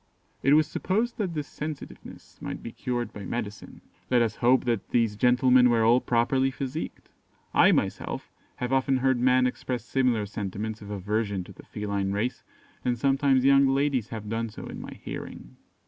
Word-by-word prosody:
It 140 +2 +5
was 155 0 +5
supposed 215 +9 -1
that 185 -6 -2
this 150 -2 -3
sensitiveness 150 -1 -8
might - - -6
be 115 - -6
cured 120 0 -3
by 100 - -8
medicine. 105 0 -6 0.3
Let 125 -2 +4
us 115 -1 -2
hope 125 +2 +3
that 115 -5 -1
these 115 -3 +2
gentlemen 125 +2 +5
were 115 -1 +3
all 120 +3 +5
properly 130 +3 +2
physicked. 135 +3 -5 0.4
I - - +6
myself - - -2 0.2
have 125 +1 -3
often 135 0 +2
heard 130 -1 +2
men 125 +1 +4
express 125 -1 -3
similar 125 -6 +1
sentiments 105 +2 -5
of 100 - -9
aversion 100 0 -2
to - - -13
the - - -15
feline 100 -2 -2
race; 110 +5 -2 0.4
and 125 -1 0
sometimes 135 0 +2
young 140 0 +6
ladies 135 -4 +1
have 110 -2 -6
done 115 +1 -2
so 105 - -9
in - - -7
my - - -8
hearing. - - -8
125 Hz, 175 wpm, -27 LUFS, 110-135 Hz, 0.4 s, I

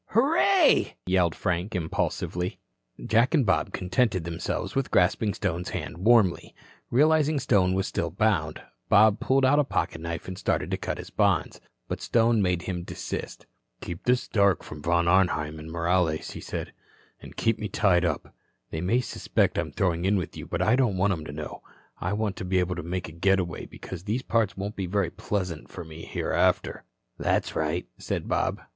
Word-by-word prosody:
"Hurray," 325 - +4
yelled 90 -3 +2
Frank, 90 +2 -2
the - - 0
impulsive. 80 0 -2 0.7
Jack 120 +8 +3
and 140 -5 +3
Bob 95 - +1
contented 95 0 0
themselves 85 0 -3
with 135 -1 0
grasping 95 +3 +2
Stone's 85 +2 -2
hand 85 - -5
warmly. 105 -3 +3 0.3
Realizing 155 +3 +3
Stone 95 -5 +2
still 85 -2 -2
was 85 - -18
bound, 85 -9 +1 0.3
Bob 105 +1 +6
pulled 135 0 +2
out 145 +3 +4
a - - +5
pocket 85 - -2
knife 85 0 -5
and 95 -1 -6
started - - -1
to - - 0
cut - - -4
his - - -9
bonds, - - +1 0.3
but - - -4
Stone 115 -1 +3
made 90 -2 0
him 90 -2 -3
desist. 85 - -6 0.4
"Keep 85 -1 -7
this 125 0 +2
dark 100 -4 +2
from 75 - -9
Von 85 +2 +2
Arnheim 85 -4 +2
and 80 +1 -9
Morales," 85 -1 0
he - - -8
said. - - -5 0.5
"And - - -12
keep 115 -1 +1
me 105 - -3
tied 95 -3 +2
up. 80 -5 -2 0.4
They 80 - -3
may 115 +8 +2
suspect 125 - 0
I'm - - -3
throwing 90 -2 0
in 100 +2 +3
with 90 - -4
you, - - -8
but - - -1
I 110 - +4
don't 120 -8 +1
want 100 +1 +2
'em 80 -4 -5
to 75 - -6
know. 75 +1 -7 0.4
I 90 +3 -2
want 105 -2 -1
to - - -5
be 95 0 0
able 90 0 +1
to 90 - -4
make 90 +2 -4
a - - -9
getaway, 90 +1 0
because 90 -1 -9
these 115 +5 -1
parts 110 -4 0
won't 100 +2 -4
be 95 -2 -3
very 95 -2 0
pleasant 90 -5 -3
for 90 - -7
me 80 +1 -10
hereafter." - - 0 0.3
"That's - - 0
right," 80 +3 -1
said - - -3
Bob. - - 0
95 Hz, 190 wpm, -26 LUFS, 85-110 Hz, 0.7 s, Bob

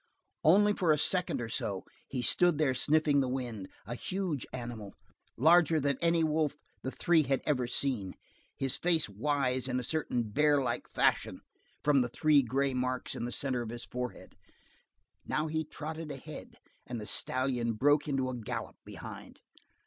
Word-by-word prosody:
Only 205 +6 +5
for 175 -5 +2
a 150 - +4
second 180 +4 +1
or 115 - -3
so 100 -4 -3 0.2
he 125 -2 -3
stood 175 +5 +4
there 150 -4 +2
sniffing 150 +2 +3
the 130 -2 +1
wind, 120 -7 -4 0.2
a 115 - -5
huge 175 0 -3
animal, 120 -5 -7 0.4
larger 160 +3 +5
than 140 -2 0
any 170 -1 +3
wolf 155 -2 +1 0.2
the 130 - -3
three 165 +4 +3
had 135 -2 0
ever 130 -5 +1
seen; 120 -7 -1 0.4
his 135 -1 0
face 165 -3 +2
wise 130 +4 0
in 125 0 0
a - - -4
certain 125 -4 -1
bear 145 +7 +3
like 120 -3 -2
fashion - - +1 0.4
from 145 -2 +4
the 120 - -1
three 150 +3 +4
gray 135 +2 0
marks 125 0 -2
in - - -4
the 120 - -4
center 130 -1 0
of 115 - -5
his 120 +1 -6
forehead. 125 0 -6 0.9
Now 150 - -1
he 160 0 -1
trotted 155 +1 -6
ahead, 135 -2 -9 0.3
and 120 -2 -4
the 105 - -6
stallion 125 -1 0
broke 145 +7 +3
into 135 -3 0
a 130 - -3
gallop 115 -4 -5
behind. - - -10
135 Hz, 170 wpm, -31 LUFS, 125-155 Hz, 0.9 s, Only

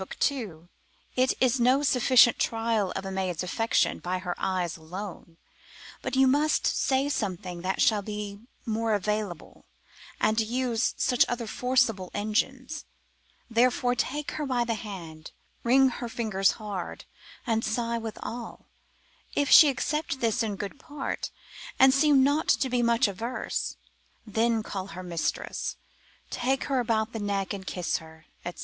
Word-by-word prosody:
2, 205 - -1 0.5
It 255 0 +3
is 255 0 +3
no 255 +4 +4
sufficient 250 -3 +5
trial 225 -4 0
of 195 - -4
a 195 - -4
maid's 185 -3 -2
affection 225 +5 +1
by 180 +1 -2
her 180 -1 -3
eyes 180 -2 -1
alone, 170 +1 -8 0.6
but - - -3
you 265 0 +5
must 290 +4 +2
say 270 +1 +2
something 185 -8 -3
that 185 +2 -2
shall 215 -2 +3
be 210 -1 -6 0.3
more 225 -1 0
available, 205 -3 -3 0.5
and 215 +1 +2
use 235 +1 0
such 250 - +3
other 240 -1 -2
forcible 225 -5 +1
engines; 255 +8 -1 0.6
therefore 245 +1 +2
take 285 +4 -2
her 300 - -3
by 250 -2 +1
the 235 - 0
hand, 175 -8 -8 0.3
wring 265 +3 +5
her 240 -1 -5
fingers 215 -5 +1
hard, 205 -5 -6 0.4
and 225 -2 0
sigh 230 +1 -1
withal; 225 +1 -7 0.7
if 285 -2 +1
she 305 - +10
accept 295 +1 -2
this 230 -1 +1
in 215 -3 -1
good 200 +7 -6
part, 290 -1 -4 0.5
and 265 0 +7
seem 280 -1 +5
not 290 +3 +2
to 260 - +2
be 245 -1 +2
much 235 +1 +3
averse, 225 +6 -3 0.5
then 225 +1 +1
call 190 -3 -5
her 185 -1 -8
mistress, 170 -2 -3 0.6
take 265 +2 0
her 270 -2 0
about 225 -2 0
the 225 - -3
neck 200 -1 -1
and 190 -1 -7
kiss 180 -2 -1
her, 160 0 -14 0.2
&c. 175 - -4
225 Hz, 145 wpm, -27 LUFS, 195-255 Hz, 0.7 s, she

